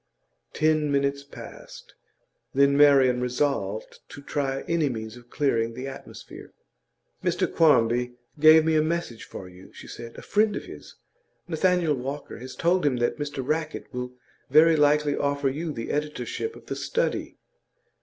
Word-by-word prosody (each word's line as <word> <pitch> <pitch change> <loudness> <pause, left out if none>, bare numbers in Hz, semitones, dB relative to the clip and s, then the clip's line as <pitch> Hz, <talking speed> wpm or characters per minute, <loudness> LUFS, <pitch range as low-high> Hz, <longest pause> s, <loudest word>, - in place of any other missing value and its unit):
Ten 155 -1 +2
minutes 140 0 0
passed; 140 - -12 0.6
then 140 +1 +4
Marian 135 -4 +5
resolved 125 -5 -2
to 140 - -11
try 135 -1 -2
any 165 -4 0
means 110 -2 -6
of 120 0 -15
clearing 115 -6 0
the 130 +2 -5
atmosphere. 135 0 -11 0.7
'Mr - - +1
Quarmby 125 -5 +2 0.2
gave 155 +1 +7
me 160 0 +2
a 155 - +4
message 155 -7 -3
for 95 - -9
you,' 90 +1 -15
she - - -12
said. 115 0 -9
'A - - -9
friend 210 0 +2
of - - -5
his, - - -12 0.5
Nathaniel 175 -1 +2
Walker, 135 +1 -6
has 130 +2 -9
told 180 +2 +1
him 145 -3 +2
that 120 +4 -1
Mr 145 -3 -4
Rackett 155 -1 -3
will 125 0 -5 0.4
very 160 +4 +6
likely 150 -1 +3
offer 140 -1 0
you 155 +4 -4
the 115 -5 -5
editorship 150 - -3
of - - -14
The - - -4
Study. 485 - -2
140 Hz, 155 wpm, -25 LUFS, 125-155 Hz, 0.7 s, gave